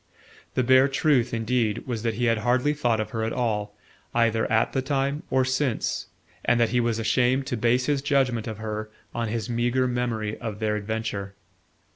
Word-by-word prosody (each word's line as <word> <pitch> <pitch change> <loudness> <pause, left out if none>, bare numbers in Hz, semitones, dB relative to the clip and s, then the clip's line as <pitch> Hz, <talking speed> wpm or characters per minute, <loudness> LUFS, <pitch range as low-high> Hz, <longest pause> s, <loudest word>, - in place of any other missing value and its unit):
The 130 - +2
bare 130 +2 +6
truth, 135 -4 +2
indeed, 115 -1 0
was 120 -4 -3
that 115 -1 -1
he 120 +3 0
had 115 -2 +2
hardly 125 +5 +2
thought 120 -7 +1
of 110 0 -3
her 110 -1 -2
at 110 - -1
all, 105 -4 -2 0.4
either 115 -1 +2
at 110 0 +2
the 135 - +1
time 140 +2 -1
or 130 -1 +2
since, 130 -1 -1 0.4
and 120 0 +3
that 115 - +3
he 125 - +1
was 115 -2 +1
ashamed 125 +4 +2
to 130 - -2
base 120 +3 +2
his 145 -1 +1
judgement 135 -5 +1
of 110 -2 -5
her 110 0 -4 0.2
on 115 -1 -2
his 110 0 -3
meagre 120 +2 +1
memory 115 -4 -2
of 110 -4 -5
their 105 -1 0
adventure. 105 -2 -3
120 Hz, 190 wpm, -25 LUFS, 110-130 Hz, 0.4 s, bare